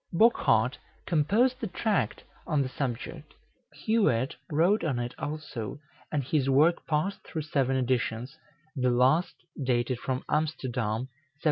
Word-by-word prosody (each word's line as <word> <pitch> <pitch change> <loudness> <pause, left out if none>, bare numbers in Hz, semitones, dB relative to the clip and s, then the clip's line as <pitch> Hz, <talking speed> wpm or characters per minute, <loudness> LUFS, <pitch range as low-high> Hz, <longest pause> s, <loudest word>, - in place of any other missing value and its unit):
Bochart 225 +7 +3 0.3
composed 205 - +2
a 225 - -1
tract 205 +3 -1 0.2
on 150 -5 +2
the 130 - -4
subject; 130 -4 -5 0.5
Huet 140 - +2 0.2
wrote 170 +7 +3
on 145 -7 0
it 120 0 -3
also, 145 -7 -5 0.3
and 145 -3 0
his 135 0 +1
work 155 +6 +3
passed 160 +6 0
through 160 -3 -4
seven 135 -3 +1
editions, 125 0 -1 0.4
the 125 -2 +2
last 130 +8 +3 0.3
dated 125 -1 0
from 130 0 -2
Amsterdam, 125 -8 -1
1701. 130 - -6
140 Hz, 130 wpm, -28 LUFS, 125-165 Hz, 0.5 s, Bochart